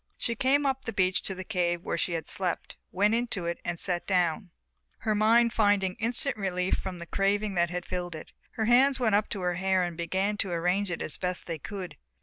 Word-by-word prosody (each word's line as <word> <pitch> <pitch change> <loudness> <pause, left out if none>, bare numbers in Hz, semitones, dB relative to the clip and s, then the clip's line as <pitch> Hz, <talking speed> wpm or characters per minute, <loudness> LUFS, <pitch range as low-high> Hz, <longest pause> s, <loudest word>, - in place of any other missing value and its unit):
She 235 - -2
came 275 +4 +2
up 265 -1 0
the 225 - -3
beach 185 0 +2
to 190 - -2
the 185 - -5
cave 175 -4 -1
where - - -2
she 170 +1 -1
had 160 -2 -2
slept, 185 -2 -3 0.2
went 205 +3 +2
into 230 -6 -1
it, 170 0 -2
and 175 - -2
sat 175 -2 -2
down, 180 0 +1 0.5
her 220 -1 +1
mind 230 +2 +4
finding 205 -3 +3
instant 245 +4 0
relief 185 -2 -1
from 185 -2 -5
the 170 - -7
craving 200 +3 0
that 170 -1 +2
had 180 0 -4
filled 175 -2 -4
it. 155 - -10 0.2
Her 220 - -1
hands 260 +4 +5
went 225 -4 +2
up 205 +1 +2
to 195 - -4
her 180 0 0
hair 190 +1 +1
and 175 -1 -3
began 190 +5 -1
to 200 - -1
arrange 180 +4 0
it 175 - -3
as 155 - -3
best 180 -1 -3
they 165 -2 -4
could. 190 +2 -7
190 Hz, 225 wpm, -28 LUFS, 175-215 Hz, 0.5 s, hands